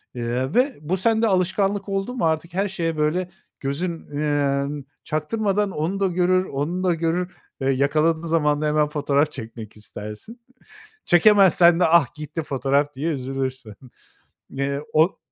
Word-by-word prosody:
ııı, 125 +4 -2
ve 260 +3 +2
bu 170 +5 -1
sende 225 +3 +2
alışkanlık 195 +1 0
oldu 195 +5 -2
mu 210 - 0
artık 160 +1 -1
her 195 +3 0
şeye, 165 -4 -3
böyle, 170 +4 0 0.3
gözün, 165 +5 -3
ımm, 145 -1 -1 0.2
çaktırmadan 200 +6 -1
onu 175 +6 -2
da 195 - +2
görür, 185 +1 +2
onu 160 +7 -3
da 180 - +3
görür, 170 +2 -1 0.3
eee, 135 - +1
yakaladığın 155 +5 +1
zaman 150 -2 +1
da 155 - +1
hemen 150 0 +2
fotoğraf 145 0 +1
çekmek 110 -3 -9
istersin. 105 - -9 0.6
Çekemezsen 175 -2 +5
de 180 - +4
ah, 170 +1 +3
gitti 155 +1 -5
fotoğraf 140 +1 0
diye 155 +5 -2
üzülürsün. 130 -4 -4 0.8
Eee, 140 +1 -1
o 160 +4 +3
160 Hz, 145 wpm, -23 LUFS, 140-185 Hz, 0.8 s, Çekemezsen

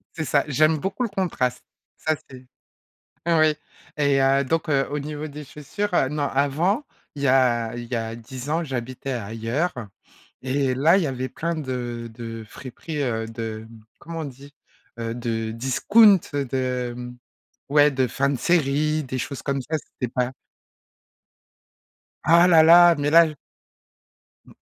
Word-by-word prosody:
C'est 160 - -3
ça, 145 -1 +2
j'aime 155 +2 +3
beaucoup 195 - -3
le 240 - 0
contraste, 165 - -2 0.3
ça 155 - 0 0.2
c'est 130 -1 -12 0.8
oui 155 -2 +4 0.4
et 140 -2 +3
heu, 135 +1 +3
donc, 165 +5 -1
heu, 135 -1 +2
au 145 - -2
niveau 150 +1 -5
des 150 +1 -9
chaussures, 165 +9 -5
heu, 135 - +2
non 150 +1 -3
avant, 160 - 0 0.3
il 140 - -7
y - - +3
a 120 -3 +2
il 120 - -6
y 125 - -5
a 115 -1 -3
10 125 +3 -9
ans 165 +3 0
j'habitais 130 -1 -5
ailleurs 115 - -2 0.7
et 130 0 0
là 155 +7 +4
il 195 - +2
y 160 - 0
avait 130 -1 -3
plein 170 +7 -3
de 120 -5 -5
de 115 -1 -7
friperies, 145 +5 -6
heu, 115 -4 -2
de 110 -1 -6
mmh, 115 -1 -15 0.2
comment 165 0 -7
on 160 - -3
dit? 140 +1 -11 0.4
Heu, 115 0 -3
de 115 -2 -3
discount, 190 - +5 0.2
heu, 140 -1 0
de 125 -1 -2
mmh, 125 0 -8 0.5
ouais 145 0 +5
de 130 -2 +1
fins 140 +4 0
de 140 - -1
série, 155 -1 +1
des 130 0 -4
choses 135 +2 -5
comme 140 0 -1
ça, 155 +6 -2 0.2
c'était 125 - -1
pas 125 0 -1 1.9
Ah 170 +3 +6
là 165 -3 +7
là, 170 +1 +8
mais 145 0 0
là 165 +1 +7
j 155 - -8 1.1
m - - -17
135 Hz, 170 wpm, -23 LUFS, 125-155 Hz, 1.9 s, là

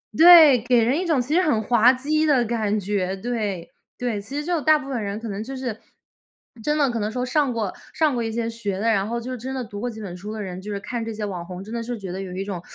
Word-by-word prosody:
对， 320 -6 +9
给 240 0 +3
人 255 +7 +1
一 370 - -2
种 315 -5 +2
其 250 +5 -2
实 355 - +4
很 290 -11 +1
滑 235 +2 +5
稽 300 +4 0
的 265 -5 +3
感 215 -2 0
觉， 190 -1 -1
对， 205 -5 -3 0.3
对。 235 -5 -2
其 265 +8 -7
实 295 - -2
就 345 -2 0
大 310 +1 +5
部 280 -2 -8
分 245 -5 -2
人 200 +1 -4
可 230 - -7
能 205 0 -4
就 270 +4 -7
是 250 -4 -4 0.8
真 300 +4 +1
的 280 -4 +2
可 235 - -2
能 210 0 -2
说 250 +2 -2
上 280 +1 +1
过 215 -5 -2 0.2
上 310 -3 +2
过 240 -2 -1
一 225 - -2
些 230 0 -2
学 220 -4 -4
的， 225 +3 +1
然 200 -2 +1
后 235 +1 -2
就 245 +2 -6
是 255 - -4
真 260 +3 -5
的 260 - -3
读 205 -3 -8
过 245 +3 -2
几 220 -2 -9
本 185 -4 -6
书 200 +4 -7
的 220 - -5
人， 185 -1 -6
就 210 +2 -7
是 200 - -3
看 235 +3 -4
这 225 - -4
些 210 0 -4
网 185 -4 -5
红， 180 +1 -8
真 215 +3 -9
的 235 - -2
是 240 +1 -4
觉 195 -4 -7
得 190 +2 -5
有 190 -2 -6
一 195 +1 -3
种， 190 -4 -5
230 Hz, 315 characters per minute, -23 LUFS, 205-260 Hz, 0.8 s, 对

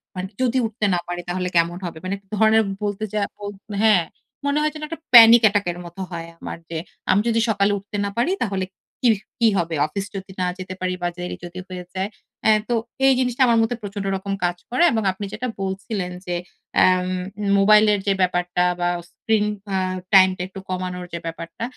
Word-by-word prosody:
মানে 185 +1 -4
যদি 255 0 +2
উঠতে 215 -1 -2
না 175 - +2
পারি 175 0 -4
তাহলে 180 0 -1
কেমন 170 +1 +2
হবে? 165 -2 -6
মানে 195 - -1 0.2
ধরনের 220 +1 +5 0.2
বলতে 205 0 -2
যা 210 - 0 0.2
বল 205 0 -6 0.3
হ্যাঁ 210 -6 +5 0.4
মনে 285 +1 +1
হয় 305 - +1
যেন 305 - -8
একটা 330 0 -6
panic 235 0 +10
attack 205 0 0
এর 175 - -9
মত 175 +2 -12
হয় 165 -1 -5
আমার. - - -6
যে 165 - -4 0.3
আমি 200 - +4
যদি 230 -1 +2
সকালে 200 -1 +2
উঠতে 200 +1 -7
না - - -1
পারি 280 +10 +2
তাহলে 195 -4 -1 0.4
কি 250 - +4 0.3
কি 230 - +5
হবে? 170 -2 -1
অফিস 195 +5 -4
যদি 190 0 -6
না 180 - +1
যেতে 185 0 -6
পারি 185 0 -1
বা 175 - +1
দেরি 180 0 -4
যদি 175 +1 -8
হয়ে 180 -1 -6
যায়। 190 +2 -1 0.4
এহ 215 - +5
তো 240 - +2 0.3
এই 270 - +7
জিনিসটা 250 0 0
আমার 235 - +4
মধ্যে 225 +1 0
প্রচন্ড 200 -1 -5
রকম 195 +1 -4
কাজ 175 0 0
করে। 250 +7 +2
এবং 220 -2 0
আপনি 195 +2 -6
যেটা 245 +4 -3
বলছিলেন 190 -1 -3
যে 175 -1 -2 0.5
এম 185 0 +4 0.5
মোবাইল 210 +2 +6
এর 205 - +1
যে 200 - +4
ব্যাপারটা 180 -1 +1 0.2
বা 175 - +1 0.2
স্ক্রিন 215 +3 0 0.3
এহ 185 -1 0 0.2
টাইম 190 -1 +8
টা - - -5
একটু 195 +1 -9
কমানোর 180 -1 -3
যে 170 - -3
ব্যাপারটা. 165 +4 -6
195 Hz, 205 wpm, -22 LUFS, 180-220 Hz, 0.5 s, panic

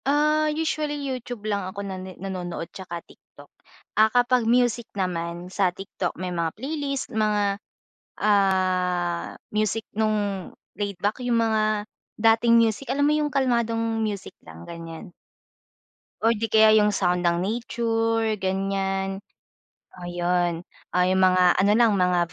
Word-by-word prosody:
Ah, 305 +2 +3
usually 305 -1 -1
YouTube 245 -4 -5
lang 205 -2 0
ako 200 +1 -6
nan 190 -1 -5 0.2
nanonood 180 -3 -5
'tsaka 175 -3 -7
TikTok. - - -18 0.4
Ah, 215 +1 +5
kapag 245 0 +2
music 240 -1 +2
naman 175 -1 -3
sa 190 -2 +2
TikTok, 180 0 -5
may 180 0 -4
mga 165 -2 -1
playlist 275 +2 -3
mga, 210 -2 +1 0.6
ah, 185 -3 +1 0.2
music 215 +1 0
nung 205 -3 -1 0.2
laid-back, 205 +3 -2
yung 245 -1 +1
mga 215 -2 +1 0.3
dating 225 +1 +4
music. 230 +3 +1
Alam 285 +2 +2
mo 300 - +3
yung 300 -1 +1
kalmadong 230 -4 0
music 205 -4 -3
lang, 80 +1 -12
ganyan. 165 0 -9 1.1
Or 225 +1 +3
di 225 - -1
kaya 220 0 +7
yung 210 -1 +3
sound 180 -2 +1
ng 170 0 +2
nature, 225 +1 0
ganyan, 195 0 -1 0.8
ayun. 175 -1 -1 0.2
Ah, 180 0 +2
yung 185 +1 +2
mga 185 -1 +5
ano 200 +2 +4
lang, 230 -2 +5
mga 180 -3 +1
205 Hz, 130 wpm, -24 LUFS, 180-230 Hz, 1.1 s, kaya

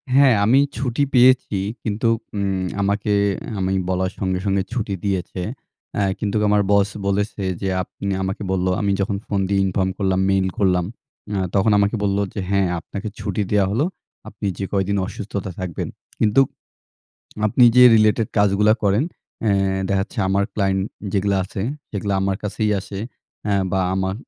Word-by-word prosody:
হ্যাঁ। 135 -3 +6
আমি 125 +6 +5 0.2
ছুটি 130 +1 0
পেয়েছি 125 -4 +5 0.3
কিন্তু 110 +2 -1 0.3
উম 95 -2 -1 0.2
আমাকে 100 +1 0 0.3
অ্যা 110 - -6
আমি 95 0 0 0.2
বলার 95 0 0
সঙ্গে 95 -2 -1
সঙ্গে 100 -1 +1
ছুটি 110 -5 -2
দিয়েছে। 95 -1 -2 0.5
অ্যা 100 - +1 0.2
কিন্তু 100 -1 -2
আমার 105 0 +4
বস 100 0 +4 0.2
বলেছে 100 0 -1 0.2
যে 95 - -1
আপনি 100 - -8 0.2
আমাকে 95 +2 -3
বললো 95 -1 +1
আমি 100 - +1
যখন 100 0 -1
ফোন 100 - -1
দিয়ে 100 - +2
inform 95 0 0
করলাম, 95 -2 +1
মেইল 95 -1 +2
করলাম। 90 -3 +2 0.5
অ্যা 100 - 0
তখন 105 +3 +3
আমাকে 100 +2 +2
বললো 100 0 +1
যে - - -4
"হ্যাঁ 100 -2 +2
আপনাকে 100 +5 -7
ছুটি 105 0 -2
দেওয়া 105 -2 +4
হলো। 120 +9 +1 0.4
আপনি - - -7
যে 100 - -2
কয়দিন 100 +1 +1
অসুস্থতায় 100 -3 -5
থাকবেন। 90 -4 -4 0.3
কিন্তু 110 +5 +4 1.0
আপনি 125 +4 +4
যে 125 - +9
রিলেটেড 110 0 +3
কাজগুলা 105 +1 +4
করেন।" 100 +5 +3 0.4
অ্যা 105 - +3 0.3
দেখা 100 -1 +1
যাচ্ছে 110 - -7
আমার 100 +1 +2
ক্লায়ন্ট 95 -2 +1 0.3
যেগুলা 100 0 +1
আছে, 95 +1 -6 0.3
সেগুলা 100 -1 -2
আমার 95 0 0
কাছেই 105 +1 -1
আসে। 95 +1 -7 0.5
অ্যা 105 - +1 0.2
বা 95 - +1
আমার 95 0 -1
100 Hz, 165 wpm, -21 LUFS, 95-105 Hz, 1.0 s, যে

